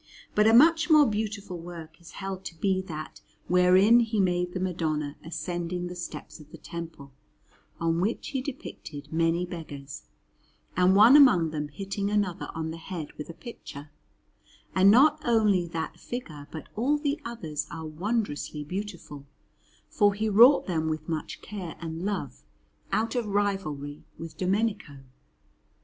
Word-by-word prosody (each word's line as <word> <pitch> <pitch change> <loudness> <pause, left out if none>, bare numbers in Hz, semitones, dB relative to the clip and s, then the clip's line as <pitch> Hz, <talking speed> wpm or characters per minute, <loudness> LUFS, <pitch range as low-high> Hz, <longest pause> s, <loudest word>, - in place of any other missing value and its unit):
But 210 +1 +4
a 225 - +5
much 325 +6 +6
more 305 -2 +7
beautiful 210 -4 -3
work 165 -2 -10
is 170 - -14
held 195 -1 -5
to 165 - -8
be 190 0 +1
that 155 -2 -7 0.3
wherein 185 +6 +6
he 225 -2 0
made 180 -2 +1
the 185 - -3
Madonna 155 -5 -2
ascending 175 +1 -4
the 180 0 -6
steps 175 -1 -7
of 150 -1 -15
the - - -11
Temple, 165 -5 -8 0.7
on 165 0 +1
which 210 +5 -1
he 270 -2 -2
depicted 150 - -8
many 165 +2 +1
beggars, 145 -5 -8 0.7
and 180 +1 +4
one 220 +7 +8
among 245 - +6
them 150 -1 -3
hitting 195 +6 -4
another 205 -4 -1
on 160 0 -3
the 165 - -7
head 165 -3 -6
with 150 - -8
a 170 - -8
pitcher; 150 - -10 0.8
and 190 +1 +6
not 295 +7 +6
only 210 -6 +3
that 165 -1 -5
figure 155 - -7
but 160 -3 -9
all 270 +7 +2
the 295 +1 -2
others 160 -11 -4
are 160 -1 -7
wondrously 155 -3 -2
beautiful, 175 -5 -7 0.6
for 205 -2 +2
he 215 +2 -1
wrought 235 +7 +7
them 160 -3 -1
with 155 0 -4
much 160 -2 -4
care 190 -5 -6
and 165 0 -5
love, 185 - -3 0.5
out 225 +1 0
of 240 -4 -1
rivalry 195 -8 -2
with 165 -1 -8
Domenico. 190 -6 -1
180 Hz, 155 wpm, -27 LUFS, 160-210 Hz, 0.8 s, one